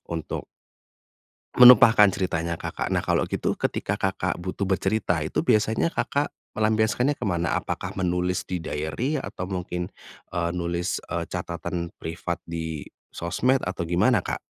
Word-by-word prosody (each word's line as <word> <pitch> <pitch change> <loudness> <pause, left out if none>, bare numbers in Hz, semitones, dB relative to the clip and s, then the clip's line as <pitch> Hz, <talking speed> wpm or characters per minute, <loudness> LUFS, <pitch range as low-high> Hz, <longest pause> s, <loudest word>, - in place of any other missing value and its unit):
untuk 80 -2 -4 1.1
menumpahkan 115 -5 +9
ceritanya 85 -3 -1
Kakak - - -3
nah - - +2
kalau - - +1
gitu - - -2
ketika - - -1
Kakak 95 -1 -1
butuh 95 +2 -3
bercerita 95 -2 +1
itu 75 -1 -1
biasanya 110 - +2
Kakak, 145 -3 -1 0.2
melampiaskannya 110 +5 +1
ke 125 - -4
mana? 85 -4 0
Apakah - - -4
menulis 90 0 0
di 90 -2 -3
diary 80 - -2
atau 95 -8 -5
mungkin, 90 -1 -3 0.4
eee, 85 -1 0
nulis, 85 0 -2
eee, - - -2
catatan 85 0 -4
privat 85 +1 -4
di 80 -2 -5 0.2
sosmed 125 +10 0
atau 95 -1 -3
gimana, 95 +6 +3
Kak? - - -4
90 Hz, 135 wpm, -25 LUFS, 85-110 Hz, 1.1 s, menumpahkan